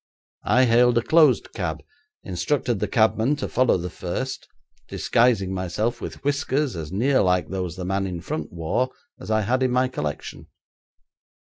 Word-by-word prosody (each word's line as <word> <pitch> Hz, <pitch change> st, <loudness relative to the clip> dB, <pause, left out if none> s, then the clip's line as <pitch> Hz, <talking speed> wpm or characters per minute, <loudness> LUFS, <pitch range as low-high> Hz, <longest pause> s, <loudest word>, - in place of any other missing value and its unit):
I 130 Hz, +1 st, +5 dB
hailed 120 Hz, 0 st, +4 dB
a 120 Hz, -, +2 dB
closed 155 Hz, 0 st, +4 dB
cab, -, -, -4 dB, 0.4 s
instructed 110 Hz, +5 st, -1 dB
the -, -, -1 dB
cabman 110 Hz, +4 st, +2 dB
to 145 Hz, -, -4 dB
follow 130 Hz, -5 st, +2 dB
the 90 Hz, 0 st, -5 dB
first, 130 Hz, +9 st, -4 dB, 0.4 s
disguising 115 Hz, -6 st, +1 dB
myself 105 Hz, +6 st, -2 dB
with -, -, -7 dB
whiskers 145 Hz, -3 st, 0 dB
as 80 Hz, -2 st, -6 dB
near 130 Hz, +8 st, +2 dB
like 90 Hz, -1 st, +1 dB
those 90 Hz, -3 st, -3 dB
the 90 Hz, -1 st, -5 dB
man 95 Hz, +1 st, -1 dB
in 90 Hz, -2 st, -4 dB
front 80 Hz, -2 st, -5 dB
wore 85 Hz, +10 st, -1 dB, 0.3 s
as -, -, -9 dB
I 110 Hz, 0 st, +2 dB
had 125 Hz, +5 st, 0 dB
in 130 Hz, -, +2 dB
my 125 Hz, +1 st, +2 dB
collection.' 75 Hz, -, -5 dB
110 Hz, 165 wpm, -24 LUFS, 90-130 Hz, 0.4 s, I